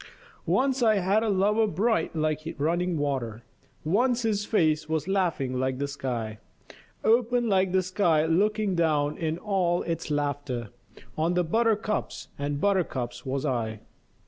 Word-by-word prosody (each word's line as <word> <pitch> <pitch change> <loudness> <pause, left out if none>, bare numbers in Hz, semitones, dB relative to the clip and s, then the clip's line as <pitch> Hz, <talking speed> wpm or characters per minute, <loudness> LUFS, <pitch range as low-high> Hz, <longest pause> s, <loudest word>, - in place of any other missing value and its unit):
Once 265 0 +2
I 220 -2 +4
had 195 +2 +2
a 225 - 0
lover 210 +3 +2
bright 200 -2 0
like 155 0 -2
running 170 +3 0
water, 130 -6 -2 0.4
Once 235 +9 +1
his 210 -2 0
face 155 -7 +1
was 160 0 -1
laughing 165 -10 0
like 130 0 -1
the 140 +1 -2
sky; 120 -6 -4 0.6
Open 240 +1 +3
like 190 -3 +2
the 185 0 +2
sky 175 -4 +2
looking 205 +4 +1
down 155 -4 +1
in 160 -1 -2
all 180 -4 0
its 165 -1 -3
laughter 145 -5 -2 0.5
On 165 +3 +1
the 180 - +3
buttercups 215 +3 0
and 145 0 -2
buttercups 130 -11 -1
was 135 +2 -2
I. 115 -5 -2
165 Hz, 145 wpm, -27 LUFS, 145-205 Hz, 0.6 s, I